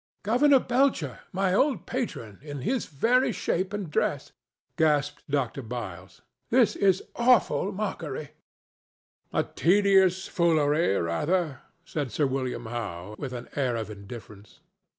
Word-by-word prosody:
"Governor 270 Hz, +7 st, +5 dB
Belcher—my 195 Hz, -, 0 dB
old 270 Hz, +7 st, +2 dB
patron—in 145 Hz, -, -5 dB
his 245 Hz, -, -1 dB
very 245 Hz, -, +2 dB
shape 185 Hz, -2 st, -1 dB
and 205 Hz, -6 st, -4 dB
dress!" -, -, -1 dB, 0.4 s
gasped 150 Hz, -2 st, +1 dB
Dr. 135 Hz, -2 st, -1 dB
Byles. 105 Hz, -7 st, -7 dB, 0.3 s
"This 240 Hz, -1 st, +4 dB
is 190 Hz, -2 st, +3 dB
an -, -, -18 dB
awful 235 Hz, -4 st, +3 dB
mockery." 165 Hz, -8 st, -4 dB, 1.0 s
"A -, -, +1 dB
tedious 190 Hz, 0 st, +3 dB
foolery, 155 Hz, -, +2 dB
rather," 150 Hz, -, 0 dB, 0.2 s
said 145 Hz, -6 st, -3 dB
Sir 150 Hz, -, +1 dB
William 130 Hz, -2 st, -2 dB
Howe, 105 Hz, -5 st, -5 dB
with 135 Hz, -3 st, -4 dB
an 125 Hz, -1 st, -6 dB
air 130 Hz, -4 st, 0 dB
of 110 Hz, -2 st, -4 dB
indifference. 105 Hz, 0 st, -11 dB
150 Hz, 120 wpm, -27 LUFS, 125-200 Hz, 1.0 s, Governor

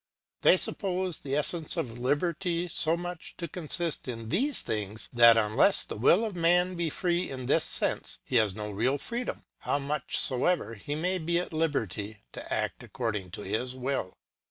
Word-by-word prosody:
They -, -, +6 dB
suppose 185 Hz, -3 st, +2 dB
the 140 Hz, 0 st, -3 dB
es 150 Hz, -, +2 dB
sence 165 Hz, -3 st, -3 dB
of 120 Hz, -1 st, -4 dB
liberty 170 Hz, +6 st, -1 dB
so 165 Hz, 0 st, +1 dB
much 175 Hz, -1 st, -7 dB
to 170 Hz, -, -4 dB
consist 165 Hz, -1 st, +1 dB
in 115 Hz, -3 st, -6 dB
these 270 Hz, -, +1 dB
things, 105 Hz, -1 st, -4 dB
that 120 Hz, -1 st, +7 dB
unless 115 Hz, -, +4 dB
the -, -, -7 dB
will 175 Hz, -, +4 dB
of 210 Hz, -4 st, -5 dB
man 175 Hz, +2 st, +3 dB
be 170 Hz, -2 st, -2 dB
free 175 Hz, +2 st, -1 dB
in 130 Hz, -2 st, -6 dB
this 150 Hz, +5 st, +2 dB
sense, -, -, -1 dB
he 125 Hz, -, 0 dB
has 105 Hz, -4 st, +2 dB
no 105 Hz, -1 st, -5 dB
real 120 Hz, +8 st, 0 dB
freedom, 240 Hz, -, -5 dB, 0.2 s
how -, -, -1 dB
much 145 Hz, +2 st, -1 dB
soever 130 Hz, -, +2 dB
he 130 Hz, +7 st, -5 dB
may 180 Hz, +4 st, -1 dB
be 170 Hz, +1 st, 0 dB
at 175 Hz, -1 st, -3 dB
liberty 110 Hz, -, -2 dB, 0.2 s
to -, -, -9 dB
act -, -, -2 dB
according 105 Hz, -7 st, -4 dB
to 95 Hz, -, -7 dB
his 125 Hz, +3 st, -2 dB
will. 130 Hz, -7 st, -3 dB
145 Hz, 180 wpm, -28 LUFS, 115-175 Hz, 0.2 s, that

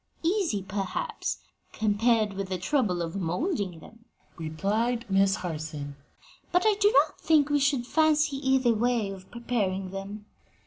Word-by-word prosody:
"Easy, 335 Hz, -, +1 dB
perhaps, 195 Hz, -, -3 dB, 0.4 s
compared 215 Hz, 0 st, +2 dB
with 195 Hz, 0 st, -4 dB
the 185 Hz, -, -1 dB
trouble 185 Hz, -, 0 dB
of 165 Hz, +1 st, -5 dB
moulding 190 Hz, -, -2 dB
them," 230 Hz, +1 st, -16 dB, 0.3 s
replied 205 Hz, +10 st, -1 dB
Miss 195 Hz, 0 st, +4 dB
Harson, 155 Hz, -4 st, -5 dB, 0.6 s
"but 360 Hz, +1 st, +2 dB
I 435 Hz, -, +5 dB
do 410 Hz, +1 st, +6 dB
not -, -, -19 dB
think 300 Hz, -2 st, +3 dB
we 290 Hz, -, +3 dB
should 275 Hz, -3 st, +1 dB
fancy 305 Hz, 0 st, +2 dB
either 265 Hz, -3 st, +2 dB
way 225 Hz, -2 st, 0 dB
of 190 Hz, -1 st, -10 dB
preparing 200 Hz, -6 st, -2 dB
them." 200 Hz, +2 st, -7 dB
215 Hz, 140 wpm, -27 LUFS, 190-270 Hz, 0.6 s, do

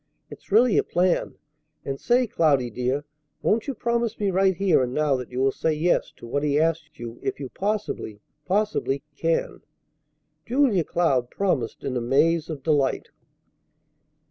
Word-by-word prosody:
It's -, -, -13 dB
really 225 Hz, +1 st, +5 dB
a -, -, +2 dB
plan. 180 Hz, 0 st, 0 dB, 0.5 s
And 135 Hz, 0 st, -4 dB
say, 245 Hz, +1 st, +3 dB
Cloudy, 140 Hz, -, +2 dB
dear, 125 Hz, +5 st, -2 dB, 0.4 s
won't 225 Hz, +4 st, +1 dB
you 275 Hz, -, -3 dB
promise 235 Hz, 0 st, -1 dB
me 200 Hz, -2 st, +1 dB
right 190 Hz, 0 st, +3 dB
here 185 Hz, -5 st, +3 dB
and 125 Hz, 0 st, -2 dB
now 150 Hz, -2 st, +2 dB
that 125 Hz, -2 st, -5 dB
you 125 Hz, -, -4 dB
will 135 Hz, +1 st, +3 dB
say 160 Hz, +4 st, 0 dB
'Yes' 165 Hz, +4 st, +1 dB
to -, -, -11 dB
what 140 Hz, +5 st, -1 dB
he 145 Hz, 0 st, +1 dB
asks 160 Hz, -1 st, -1 dB
you 120 Hz, 0 st, -8 dB
if -, -, -3 dB
you 135 Hz, -3 st, -5 dB
possibly, 200 Hz, -, -3 dB, 0.2 s
possibly 185 Hz, -7 st, 0 dB
can?" 165 Hz, +2 st, -1 dB, 0.8 s
Julia 240 Hz, -, +2 dB
Cloud 135 Hz, -8 st, +1 dB
promised 160 Hz, -, -1 dB
in 130 Hz, -, -3 dB
a 125 Hz, -, 0 dB
maze 155 Hz, +7 st, +2 dB
of 145 Hz, -4 st, -6 dB
delight. 145 Hz, -4 st, +1 dB
160 Hz, 165 wpm, -24 LUFS, 135-195 Hz, 0.8 s, really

